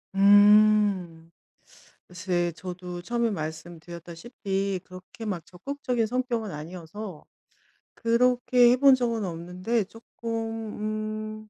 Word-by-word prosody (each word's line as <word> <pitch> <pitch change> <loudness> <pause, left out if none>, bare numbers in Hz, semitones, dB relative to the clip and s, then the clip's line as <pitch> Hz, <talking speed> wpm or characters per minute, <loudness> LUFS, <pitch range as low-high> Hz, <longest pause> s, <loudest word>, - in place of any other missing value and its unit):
음. 205 -4 +5 0.8
글쎄 180 -1 -1
저도 180 0 -7
처음에 235 +3 0
말씀드렸다시피 175 +4 -5
그렇게 185 +5 -11
막 180 -6 -3
적극적인 245 +5 -3
성격은 240 -2 -2
아니어서 170 +4 -8 0.7
그렇게 245 +1 +4
해 - - +5
본 275 0 +7
적은 235 -4 -1
없는데 180 +6 -2
쪼끔 215 -1 -5
205 Hz, 220 characters per minute, -26 LUFS, 180-230 Hz, 0.8 s, 본